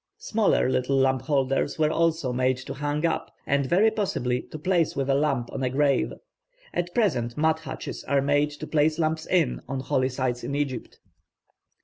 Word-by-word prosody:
Smaller 220 Hz, -, +1 dB
little 130 Hz, +1 st, +1 dB
lamp 130 Hz, -1 st, +2 dB
holders 135 Hz, -1 st, 0 dB
were 155 Hz, -1 st, +2 dB
also 160 Hz, -6 st, +1 dB
made 130 Hz, +1 st, +1 dB
to 130 Hz, -, -7 dB
hang 145 Hz, +2 st, -2 dB
up, 165 Hz, -, -1 dB
and 140 Hz, -1 st, +1 dB
very 200 Hz, +9 st, +4 dB
possibly 125 Hz, -, -1 dB
to -, -, -9 dB
place 170 Hz, 0 st, +1 dB
with 135 Hz, -1 st, 0 dB
a -, -, +4 dB
lamp 135 Hz, -4 st, 0 dB
on 135 Hz, -, -4 dB
a 130 Hz, -, +1 dB
grave. 140 Hz, +1 st, +2 dB, 0.6 s
At 175 Hz, 0 st, -2 dB
present 135 Hz, -, +1 dB
mud 160 Hz, +1 st, +2 dB
hutches 150 Hz, -5 st, -7 dB
are 140 Hz, -, +2 dB
made 145 Hz, +1 st, +2 dB
to 150 Hz, +1 st, -8 dB
place 155 Hz, 0 st, +2 dB
lamps 160 Hz, -1 st, -1 dB
in 165 Hz, -9 st, +1 dB
on 135 Hz, 0 st, -3 dB
holy 130 Hz, 0 st, +1 dB
sites 125 Hz, -2 st, -2 dB
in 140 Hz, -, -3 dB
Egypt. 140 Hz, -4 st, -3 dB
145 Hz, 185 wpm, -26 LUFS, 130-160 Hz, 0.6 s, very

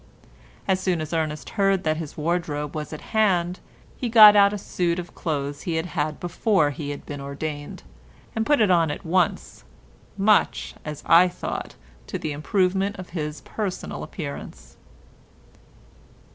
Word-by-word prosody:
As 190 Hz, -1 st, +2 dB
soon 185 Hz, -2 st, 0 dB
as 155 Hz, +1 st, -5 dB
Ernest 155 Hz, -2 st, -2 dB
heard 195 Hz, -3 st, +2 dB
that 155 Hz, 0 st, +1 dB
his 155 Hz, -3 st, -7 dB
wardrobe 150 Hz, -2 st, -2 dB
was 150 Hz, -1 st, -4 dB
at 155 Hz, -, -7 dB
hand, 185 Hz, -5 st, +2 dB, 0.4 s
he 245 Hz, -, -3 dB
got 215 Hz, -2 st, +10 dB
out 200 Hz, -1 st, +6 dB
a 210 Hz, -, -3 dB
suit 175 Hz, -3 st, -1 dB
of 175 Hz, -1 st, -6 dB
clothes 145 Hz, -3 st, -3 dB
he 170 Hz, -, -2 dB
had 160 Hz, +1 st, -1 dB
had 155 Hz, -3 st, -2 dB
before 175 Hz, -2 st, +1 dB
he 145 Hz, 0 st, -6 dB
had 145 Hz, -, -6 dB
been 145 Hz, -1 st, -6 dB
ordained, 145 Hz, +1 st, -6 dB, 0.5 s
and 220 Hz, -, +1 dB
put 295 Hz, +5 st, +3 dB
it 205 Hz, -3 st, +4 dB
on 165 Hz, -3 st, +4 dB
at 145 Hz, -, -5 dB
once, 180 Hz, +2 st, 0 dB, 0.5 s
much, 205 Hz, +1 st, +2 dB
as 150 Hz, -2 st, -7 dB
I 170 Hz, +2 st, +7 dB
thought, 175 Hz, -, -5 dB, 0.3 s
to -, -, -3 dB
the 155 Hz, -, -4 dB
improvement 190 Hz, +5 st, 0 dB
of 185 Hz, -1 st, -9 dB
his 150 Hz, -4 st, -4 dB
personal 200 Hz, +1 st, -4 dB
appearance. 140 Hz, -, -8 dB
170 Hz, 160 wpm, -24 LUFS, 150-190 Hz, 0.5 s, got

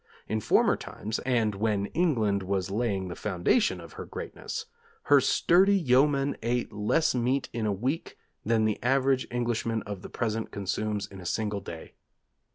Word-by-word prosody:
In 110 Hz, -, -1 dB
former -, -, +4 dB
times 110 Hz, +2 st, -5 dB
and 115 Hz, -4 st, +2 dB
when 100 Hz, 0 st, 0 dB
England 110 Hz, -, +1 dB
was 95 Hz, 0 st, -2 dB
laying 100 Hz, -3 st, -1 dB
the 85 Hz, -, -6 dB
foundation 105 Hz, -, +1 dB
of -, -, -11 dB
her -, -, -7 dB
greatness, 455 Hz, -, -6 dB, 0.4 s
her -, -, +5 dB
sturdy 190 Hz, +4 st, +4 dB
yeomen 140 Hz, -2 st, +3 dB
ate 120 Hz, 0 st, -1 dB
less 105 Hz, +10 st, +2 dB
meat 125 Hz, +2 st, 0 dB
in 115 Hz, -2 st, -1 dB
a -, -, +1 dB
week, 130 Hz, +11 st, -3 dB, 0.3 s
than 110 Hz, 0 st, +2 dB
the 110 Hz, -1 st, -1 dB
average 135 Hz, +1 st, +2 dB
Englishman 115 Hz, -2 st, -1 dB
of 100 Hz, -2 st, -6 dB
the -, -, -9 dB
present 110 Hz, -1 st, -2 dB
consumes 105 Hz, +1 st, -2 dB
in 95 Hz, -1 st, -11 dB
a -, -, -11 dB
single 105 Hz, 0 st, -1 dB
day.... 80 Hz, -3 st, -9 dB
110 Hz, 165 wpm, -28 LUFS, 100-130 Hz, 0.4 s, her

